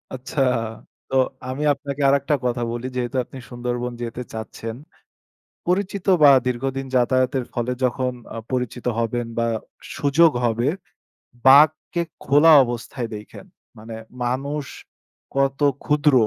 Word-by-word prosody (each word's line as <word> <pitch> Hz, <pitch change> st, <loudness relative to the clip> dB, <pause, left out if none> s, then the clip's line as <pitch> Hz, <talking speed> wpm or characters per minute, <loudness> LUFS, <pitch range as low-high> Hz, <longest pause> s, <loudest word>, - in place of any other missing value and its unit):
আচ্ছা। 130 Hz, +2 st, -3 dB, 0.7 s
তো 135 Hz, -, -2 dB, 0.3 s
আমি 135 Hz, +3 st, -3 dB
আপনাকে 140 Hz, +1 st, -6 dB
আরেকটা 140 Hz, +1 st, +2 dB
কথা 120 Hz, 0 st, 0 dB
বলি 120 Hz, +2 st, -4 dB
যেহেতু 125 Hz, +1 st, -2 dB
আপনি 135 Hz, -, -12 dB
সুন্দরবন 120 Hz, 0 st, -3 dB
যেতে 120 Hz, +1 st, -4 dB
চাচ্ছেন। 110 Hz, 0 st, -6 dB, 0.9 s
পরিচিত 195 Hz, +2 st, -1 dB, 0.2 s
বা 145 Hz, -, +9 dB, 0.2 s
দীর্ঘদিন 135 Hz, +2 st, -2 dB
যাতায়াতের 130 Hz, +1 st, +2 dB
ফলে 120 Hz, 0 st, -2 dB
যখন 125 Hz, 0 st, 0 dB, 0.2 s
আ -, -, -6 dB, 0.2 s
পরিচিত 125 Hz, -1 st, -3 dB
হবেন 115 Hz, +1 st, -1 dB
বা 115 Hz, -, +2 dB, 0.5 s
সুযোগ 145 Hz, +4 st, +4 dB
হবে। 120 Hz, +3 st, +1 dB, 0.8 s
বাঘকে 155 Hz, +5 st, +5 dB, 0.2 s
খোলা 150 Hz, +4 st, +6 dB
অবস্থায় 120 Hz, 0 st, -5 dB
দেইখেন। 105 Hz, -, -11 dB, 0.3 s
মানে 110 Hz, +1 st, -9 dB, 0.3 s
মানুষ 140 Hz, +4 st, -2 dB, 0.7 s
কত 135 Hz, 0 st, +1 dB, 0.3 s
ক্ষুদ্র 150 Hz, 0 st, +3 dB
130 Hz, 120 wpm, -22 LUFS, 120-140 Hz, 0.9 s, বা